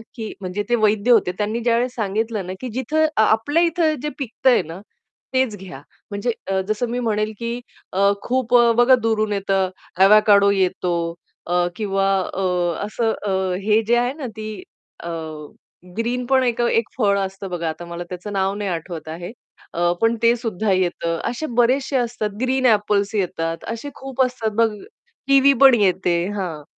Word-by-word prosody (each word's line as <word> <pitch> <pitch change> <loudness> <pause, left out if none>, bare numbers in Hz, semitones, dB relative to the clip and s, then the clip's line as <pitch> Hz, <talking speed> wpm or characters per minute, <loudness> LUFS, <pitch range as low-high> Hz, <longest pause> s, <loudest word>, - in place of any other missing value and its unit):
की 220 -3 -6
म्हणजे 185 +3 -3
ते 240 - +4
वैद्य 215 +1 +2
होते 210 -6 +4
त्यांनी 215 +2 -1
ज्यावेळेस 240 +2 0
सांगितलं 215 -1 -2
ना, 185 - -4
की 255 - -4
जिथे 305 +5 +1
आ 220 - +5
आपल्या 290 +10 +2
इथे 330 -2 +1
जे 300 - -2
पिकतंय 250 -2 +2
ना, 165 +4 -8 0.5
तेच 260 -5 +1
घ्या. 180 -8 -10 0.3
म्हणजे 205 +4 -1 0.2
अ, 190 - +1
जसं 215 +3 -1
मी 245 +1 -2
म्हणेल 215 -2 -1
की 235 +1 -3 0.3
अ, 200 +1 +3
खूप 250 -1 0
अ, 235 -1 +5
बघा 250 +2 +6
दूरून 215 -1 +1
येतं, 195 -1 0 0.3
अवॅकाडो 200 0 +6
येतो 185 -2 0 0.5
अ, 175 0 +2
किंवा 195 -2 -1 0.3
अ, 195 - -3 0.4
असं 225 +1 -1 0.2
अ, 190 -1 0
हे 215 +1 +3
जे 240 - +4
आहे 245 +2 0
ना 285 -4 -6
ती 215 0 -5 0.6
अ, 170 - -5 0.9
ग्रीन 245 +2 -1
पण 260 0 +3
एक 240 -1 0
अ, 240 - +2
एक 230 -1 +1
फळ 200 -4 +2
असतं 195 0 -4
बघा, 170 -2 -3
आता 165 +2 -6
मला 170 0 -6
त्याचं 185 +3 -7
नाव 195 0 0
नाही 205 -2 -3
आठवत 165 -2 -5
आहे. 175 +5 -6 0.4
अ, 175 +1 +1
पण 225 +1 +3
ते 235 +1 +5
सुद्धा 220 -4 -2
येतं. 175 -2 0
असे 245 +6 -4
बरेचशे 265 +3 +2
असतात. 235 -3 -1
ग्रीन 260 0 +1
एपल्स 205 -2 +2
येतात, 165 -4 -2
असे 230 +5 -5
खूप 270 -1 -4
असतात 240 -4 -3
बघ 230 - +5 0.6
किवी 275 0 +6
पण 270 -2 +9
येते. 185 -2 +2 0.2
हां, 165 -7 -4
215 Hz, 175 wpm, -21 LUFS, 190-245 Hz, 0.9 s, पण